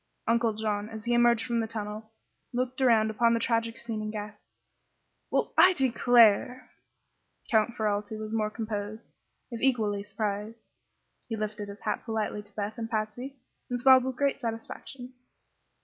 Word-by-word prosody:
Uncle 230 -1 +2
John, 210 -1 -2
as 220 0 -8
he 240 - +1
emerged 240 -1 +4
from 235 -2 0
the 225 - -1
tunnel, 215 0 -6 0.4
looked 255 +2 -2
around 225 -4 +4
upon 230 +2 +3
the - - +1
tragic 230 -1 0
scene 225 -2 -5
and 215 0 -4
gasped: 210 -1 -7 0.9
"Well, - - 0
I 370 - +8
declare!" 245 - +4 0.8
Count 220 +1 +3
Ferralti 210 -1 -1
was 215 0 -6
more 215 -1 +1
composed, 215 0 -5 0.4
if 235 - -5
equally 215 -6 +1
surprised. 210 +2 -4 0.7
He 225 - -1
lifted 210 -1 -4
his 200 0 -10
hat - - -2
politely 220 -2 -2
to 205 0 -20
Beth 210 +2 -4
and 225 -1 -4
Patsy, 225 +5 -3 0.3
and 245 0 -2
smiled 260 0 +7
with 260 0 -3
great 280 +1 0
satisfaction. 245 +2 -6
225 Hz, 155 wpm, -28 LUFS, 215-240 Hz, 0.9 s, I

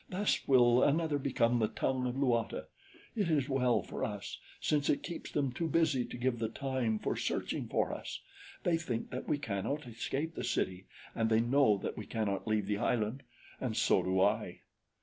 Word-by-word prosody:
"Thus 195 +3 0
will 125 -2 +6
another 155 0 +2
become 120 -3 +2
the 110 - +3
tongue 130 +2 -1
of 125 - -3
Luata. 120 -5 0 0.5
It 205 -6 +1
is 145 -5 +2
well 125 -3 +2
for - - -5
us, 105 -2 -4 0.2
since 145 -2 +1
it - - +2
keeps 170 - -6
them 140 -3 0
too 165 +7 -2
busy 155 -6 +2
to - - -8
give 120 -1 0
the 110 -1 -1
time 130 -3 -1
for - - -2
searching - - -2
for - - 0
us. - - -6 0.4
They 170 -2 +3
think 125 -8 -3
that 125 - -5
we 150 - +1
cannot 140 +3 -3
escape 135 +7 -3
the - - -5
city, 95 -6 -1 0.3
and 115 -1 +1
they 110 0 +4
know 120 -2 +4
that 100 - -5
we 105 - -7
cannot 105 -2 -2
leave 110 -2 +1
the 105 0 -1
island 115 +4 0 0.4
and - - -2
so - - +4
do 95 0 0
I." 95 - +1
125 Hz, 190 wpm, -33 LUFS, 110-145 Hz, 0.5 s, will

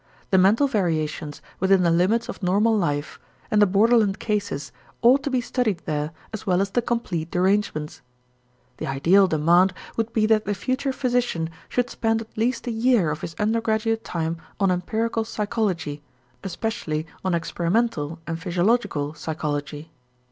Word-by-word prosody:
The 190 - +5
mental 205 +9 +5
variations 160 - -2 0.2
within 190 0 +4
the 170 - +3
limits 190 +8 +2
of - - -7
normal 205 +5 +3
life 145 -7 -1 0.3
and 210 -1 +4
the 205 - +6
borderland 210 +1 +3
cases 200 -10 -2 0.3
ought 255 +4 +6
to 285 - -2
be 255 -2 +1
studied 225 -8 -1
there 150 0 -2 0.2
as 220 -1 -6
well 180 -1 +3
as 195 0 0
the 245 - +1
complete 190 -9 -2
derangements. 180 -4 0 0.8
The - - -4
ideal 170 +9 +4
demand 175 +4 +3 0.2
would 225 0 -1
be 220 -2 +2
that 215 -1 +3
the 205 +1 -1
future 260 +5 -1
physician 245 -11 -1 0.2
should 245 -1 0
spend 225 0 0
at 225 - -12
least 235 +4 0
a 240 - -2
year 225 -7 +2
of 150 - -5
his 165 - -6
undergraduate 225 +1 0
time 165 0 -3 0.2
on 195 -2 +3
empirical 220 +6 -1
psychology, 205 -9 -2 0.4
especially 175 -5 -3 0.2
on 185 -2 +1
experimental 170 -1 -1
and 165 0 -4
physiological 175 -4 0
psychology. 150 0 -4
195 Hz, 155 wpm, -24 LUFS, 165-225 Hz, 0.8 s, the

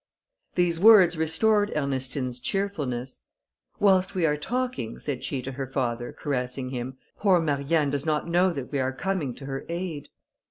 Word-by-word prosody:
These 175 -2 +2
words 190 -4 +7
restored 205 +7 +2
Ernestine's 130 -3 -2
cheerfulness. 135 -7 -2 0.6
"Whilst 190 -2 +3
we 180 -3 +2
are 150 -2 +2
talking," 245 - -3
said 140 -4 -4
she 135 -3 -3
to 135 - -4
her 135 0 -5
father, 120 -2 -2
caressing 130 -2 -3
him, 130 +1 -5 0.2
"poor 190 -4 +4
Marianne 145 -1 +1
does 140 -1 -1
not 155 0 0
know 175 +2 +3
that 140 -6 -6
we 140 - 0
are 130 0 0
coming 160 -5 -2
to 135 - -10
her 135 0 -4
aid." 170 -4 -4
145 Hz, 160 wpm, -26 LUFS, 130-180 Hz, 0.6 s, words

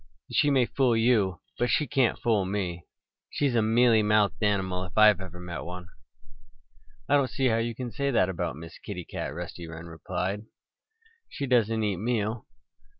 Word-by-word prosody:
"She 145 - +3
may 135 -3 +4
fool 125 -2 +1
you; 110 -6 +2 0.2
but 120 - +1
she 150 +6 +2
can't 135 -4 +1
fool 110 -4 +1
me. 90 -3 -3 0.4
She's 140 -3 0
a 115 - +3
mealy 115 +1 +4
mouthed 105 0 +2
animal, 95 -3 0
if 90 - -12
ever 105 -3 +5
I - - -10
met 85 -6 -6
one." 90 0 -8 1.2
"I 145 - +4
don't 140 -3 +2
see 135 -2 +1
how 110 - +2
you 115 0 -2
can 125 0 -5
say 140 +6 -1
that 115 -8 +3
about 90 -7 -3
Miss 80 +2 -11
Kitty 90 -5 -7
Cat," - - -5
Rusty 85 +1 -7
replied. 85 +5 -5 0.8
"She 140 - -4
doesn't 115 -3 +2
eat 100 -3 0
meal." 110 +1 -2
105 Hz, 170 wpm, -27 LUFS, 90-120 Hz, 1.2 s, ever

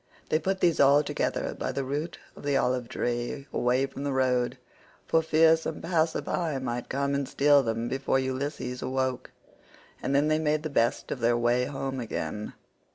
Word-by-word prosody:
They 155 - +2
put 190 +3 -1
these 170 -2 +3
all 140 +2 +6
together - - -2
by - - -1
the 140 - -2
root 145 +5 -3 0.2
of - - -12
the 145 -1 +1
olive 125 -2 0
tree, 120 +3 -2
away 125 +2 +2
from 135 0 -7
the 145 - -1
road, 125 -2 +1 0.5
for 165 - +3
fear 160 0 +5
some 160 - -5
passer 165 -2 0
by116 155 -7 -2
might 120 -1 -3
come 140 +1 0
and 140 -1 -1
steal 145 0 +5
them 115 -1 -2
before 135 +1 0
Ulysses 130 -1 -3
awoke; 130 -1 -2 0.7
and 140 - -1
then 145 +2 +3
they 155 0 +2
made 155 -1 +1
the 155 - -4
best 115 -4 +1
of - - -3
their 120 0 +2
way 120 +1 +2
home 135 -1 -4
again. 105 -2 -4
135 Hz, 185 wpm, -28 LUFS, 125-150 Hz, 0.7 s, all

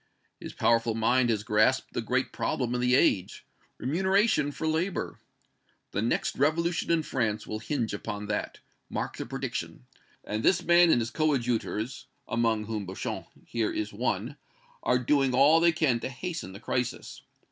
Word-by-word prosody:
His - - -8
powerful 115 -1 +2
mind 120 +2 +2
has 110 -2 0
grasped 110 +4 +2
the - - -1
great 130 +3 -1
problem 125 -2 -1
of 125 - -1
the 125 +1 +3
age 95 -8 +1 0.3
remuneration 190 - +2
for 160 - -5
labor. 160 +4 -1 0.7
The 100 - -1
next 115 - 0
revolution 165 +5 +1
in 165 -1 +2
France 110 -7 -1
will 110 - -4
hinge 115 -2 -2
upon 105 0 -5
that 105 0 -3 0.3
mark - - -4
the - - -5
prediction - - -5 0.4
and 105 +1 -3
this 180 +9 +3
man 175 0 +6
and 120 - +4
his 115 +1 -3
coadjutors, 125 -5 -1 0.2
among 115 -2 +1
whom 105 -3 -4
Beauchamp 95 - -5 0.2
here 115 -2 -1
is 105 -1 -3
one, 115 +4 -2 0.4
are 125 - +2
doing 130 +1 +2
all 145 +5 +6
they 170 +1 +5
can 155 -7 +1
to - - -4
hasten 155 - -5
the 100 - -9
crisis. 125 +1 -3
125 Hz, 160 wpm, -28 LUFS, 110-150 Hz, 0.7 s, man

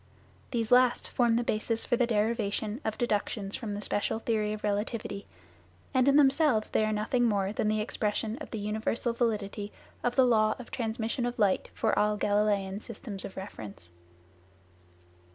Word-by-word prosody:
These 230 -2 -2
last 250 0 +4
form 235 -2 +2
the 240 - +1
basis 225 0 -1
for - - +2
the 240 0 +2
derivation 220 +1 0
of 220 -1 -2
deductions 210 -3 -1
from 210 -4 -4
the 205 - -5
special 205 +1 0
theory 220 -2 0
of 215 0 -5
relativity, 205 0 -2 0.7
and 260 0 +3
in 280 - +5
themselves 280 -5 +4
they - - +2
are 215 - 0
nothing 215 +4 +1
more 200 -3 +1
than 215 - 0
the 215 0 +1
expression 215 0 -1
of 300 - -8
the 225 - -4
universal 220 +3 -1
validity 210 -3 -2 0.3
of 245 0 0
the 260 - +6
law 215 -3 +3
of 250 - -11
transmission 230 +1 -2
of 245 - -4
light 205 -4 +2
for - - +1
all 210 0 +2
Galileian 205 -1 +1
systems 210 -4 -7
of 190 - -9
reference. 105 - -8
215 Hz, 170 wpm, -29 LUFS, 205-240 Hz, 0.7 s, the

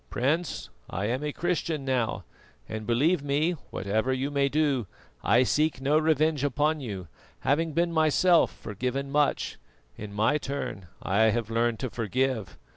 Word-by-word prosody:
Prince, 155 +8 -1 0.2
I 100 - -2
am 125 +6 -1
a 150 - -1
Christian 165 -3 -2
now, 120 -7 0 0.4
and 110 -1 -6
believe 145 +8 +3
me, 145 +4 +1 0.2
whatever 110 +6 -1
you 130 +2 -1
may 140 -1 +2
do, 140 -7 +1 0.4
I 120 +2 +5
seek 150 +2 +1
no 145 +3 +3
revenge 155 -2 +2
upon 150 +3 +1
you; 100 - -6 0.3
having 155 +3 +1
been 170 +2 +1
myself 165 +2 +4
forgiven 125 +6 -3
so 135 - -10
much, 145 0 +1 0.4
in 105 -1 -7
my 110 +9 +2
turn 135 -10 -5 0.2
I 100 +4 +3
have 110 0 +1
learned 115 0 +1
to 130 -4 -3
forgive. 115 -1 -1
135 Hz, 155 wpm, -27 LUFS, 115-150 Hz, 0.4 s, I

